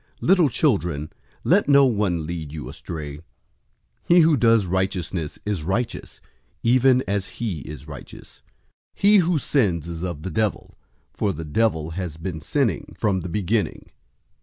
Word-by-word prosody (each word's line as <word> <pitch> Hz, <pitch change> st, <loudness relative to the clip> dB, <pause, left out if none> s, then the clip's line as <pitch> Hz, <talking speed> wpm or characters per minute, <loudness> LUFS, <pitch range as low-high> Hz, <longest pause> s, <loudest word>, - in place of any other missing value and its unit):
003:007 -, -, -2 dB
Little 180 Hz, -6 st, +5 dB
children, 90 Hz, -, 0 dB, 0.3 s
let 185 Hz, -1 st, +3 dB
no 140 Hz, -1 st, +7 dB
one 100 Hz, -9 st, 0 dB
lead 80 Hz, -3 st, -5 dB
you 75 Hz, -5 st, -6 dB
astray. 75 Hz, 0 st, -7 dB, 0.9 s
He 175 Hz, 0 st, +7 dB
who 160 Hz, -1 st, +5 dB
does 115 Hz, -4 st, +4 dB
righteousness 90 Hz, -3 st, -2 dB
is 105 Hz, -5 st, -1 dB
righteous, 95 Hz, +9 st, -3 dB, 0.4 s
even 130 Hz, +2 st, +4 dB
as 100 Hz, -1 st, -1 dB
he 105 Hz, -9 st, -2 dB
is 75 Hz, +2 st, -9 dB
righteous. 70 Hz, -4 st, -11 dB, 0.5 s
003:008 -, -, -23 dB
He 205 Hz, +1 st, +6 dB
who 175 Hz, -2 st, +3 dB
sins 105 Hz, -, +1 dB
is 85 Hz, -1 st, -6 dB
of 85 Hz, -4 st, -4 dB
the 95 Hz, -, -4 dB
devil, 105 Hz, +4 st, -2 dB, 0.4 s
for 100 Hz, -, 0 dB
the 80 Hz, -2 st, -6 dB
devil 80 Hz, -2 st, 0 dB
has 85 Hz, -2 st, -5 dB
been 80 Hz, -1 st, -5 dB
sinning 115 Hz, -, -1 dB
from 100 Hz, -3 st, +1 dB
the 90 Hz, 0 st, -6 dB
beginning. 105 Hz, +4 st, -1 dB
95 Hz, 155 wpm, -23 LUFS, 80-120 Hz, 0.9 s, no